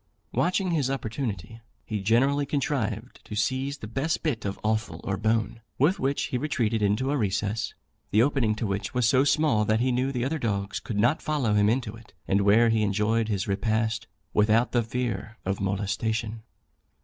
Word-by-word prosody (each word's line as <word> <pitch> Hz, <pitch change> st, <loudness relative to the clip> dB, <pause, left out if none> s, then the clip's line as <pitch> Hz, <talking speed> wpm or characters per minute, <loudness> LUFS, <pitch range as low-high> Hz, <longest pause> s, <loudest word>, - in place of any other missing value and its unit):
Watching 185 Hz, +1 st, +1 dB
his 145 Hz, -6 st, +1 dB
opportunity, 115 Hz, -, -4 dB, 0.2 s
he 110 Hz, -2 st, -3 dB
generally 135 Hz, +7 st, +2 dB
contrived 140 Hz, -2 st, -2 dB
to -, -, -7 dB
seize 130 Hz, +6 st, -1 dB
the 110 Hz, -, -8 dB
best 135 Hz, +8 st, -1 dB
bit 135 Hz, -10 st, -1 dB
of 100 Hz, -, -3 dB
offal 110 Hz, -6 st, -1 dB
or 95 Hz, -, -1 dB
bone, 110 Hz, +2 st, 0 dB, 0.2 s
with 175 Hz, +8 st, +3 dB
which 135 Hz, +1 st, 0 dB
he 125 Hz, -, -1 dB
retreated 120 Hz, -6 st, 0 dB
into 105 Hz, +7 st, +1 dB
a 145 Hz, -, +1 dB
recess, 105 Hz, 0 st, -1 dB, 0.3 s
the 110 Hz, +3 st, +4 dB
opening 125 Hz, -6 st, +1 dB
to 110 Hz, -, -3 dB
which 100 Hz, +2 st, -3 dB
was 125 Hz, -3 st, +3 dB
so 130 Hz, +2 st, +4 dB
small 145 Hz, -6 st, +3 dB
that 110 Hz, +1 st, +2 dB
he 125 Hz, +2 st, +2 dB
knew 130 Hz, +2 st, 0 dB
the 125 Hz, -2 st, -1 dB
other 155 Hz, +3 st, -1 dB
dogs 100 Hz, -4 st, -2 dB
could 110 Hz, -, -5 dB
not 120 Hz, +9 st, +3 dB
follow 145 Hz, -8 st, 0 dB
him 105 Hz, 0 st, +4 dB
into 115 Hz, -2 st, -1 dB
it, 115 Hz, -1 st, -16 dB
and 100 Hz, +1 st, +2 dB
where 110 Hz, +4 st, +5 dB
he 110 Hz, -1 st, +2 dB
enjoyed 105 Hz, +2 st, +1 dB
his 100 Hz, -2 st, -1 dB
repast 110 Hz, +2 st, 0 dB, 0.3 s
without 110 Hz, +3 st, +3 dB
the 120 Hz, -, +3 dB
fear 115 Hz, -2 st, -3 dB
of 95 Hz, +1 st, -2 dB
molestation. 105 Hz, +3 st, -2 dB
115 Hz, 185 wpm, -26 LUFS, 105-130 Hz, 0.3 s, where